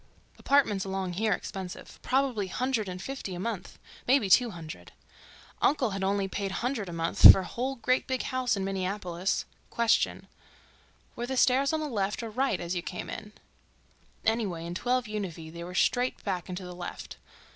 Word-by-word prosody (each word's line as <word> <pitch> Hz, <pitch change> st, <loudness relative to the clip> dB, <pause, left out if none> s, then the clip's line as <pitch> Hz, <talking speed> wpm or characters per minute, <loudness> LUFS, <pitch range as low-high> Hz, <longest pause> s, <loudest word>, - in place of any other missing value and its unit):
Apartments 220 Hz, -9 st, +3 dB
along 190 Hz, -2 st, -3 dB
here 215 Hz, +4 st, 0 dB
expensive—probably 205 Hz, +5 st, -2 dB
hundred 230 Hz, 0 st, -1 dB
and 180 Hz, 0 st, -6 dB
fifty 235 Hz, -5 st, -5 dB
a -, -, -6 dB
month—maybe 220 Hz, +3 st, -2 dB
two 245 Hz, +3 st, +6 dB
hundred. 165 Hz, -5 st, -9 dB, 0.7 s
Uncle 255 Hz, -6 st, +2 dB
had 195 Hz, 0 st, -3 dB
only 195 Hz, 0 st, +1 dB
paid 195 Hz, 0 st, -3 dB
hundred 235 Hz, -6 st, -2 dB
a -, -, -5 dB
month 165 Hz, 0 st, +9 dB
for 190 Hz, -, +1 dB
whole 250 Hz, +9 st, -3 dB
great 255 Hz, +1 st, +1 dB
big 260 Hz, -1 st, -1 dB
house 255 Hz, -4 st, 0 dB
in 195 Hz, -, -2 dB
Minneapolis. 190 Hz, -1 st, -2 dB, 0.2 s
Question—were 235 Hz, +1 st, -3 dB
the 265 Hz, 0 st, -2 dB
stairs 270 Hz, +2 st, +4 dB
on 315 Hz, -1 st, 0 dB
the 305 Hz, -, -2 dB
left 205 Hz, -3 st, -2 dB
or 225 Hz, -, -5 dB
right 255 Hz, -2 st, 0 dB
as 175 Hz, 0 st, -3 dB
you 175 Hz, -, -1 dB
came 180 Hz, -, -6 dB
in? 210 Hz, -1 st, -8 dB, 0.9 s
Anyway, 205 Hz, -7 st, 0 dB
in 170 Hz, -, -5 dB
12 250 Hz, +7 st, 0 dB
Univee 180 Hz, -7 st, -5 dB
they 170 Hz, 0 st, -7 dB
were 180 Hz, +1 st, -8 dB
straight 250 Hz, +5 st, +1 dB
back 185 Hz, -4 st, -3 dB
and 180 Hz, -, -4 dB
to 185 Hz, -, -7 dB
the 180 Hz, -, -7 dB
left. 175 Hz, 0 st, -7 dB
200 Hz, 165 wpm, -29 LUFS, 180-250 Hz, 0.9 s, month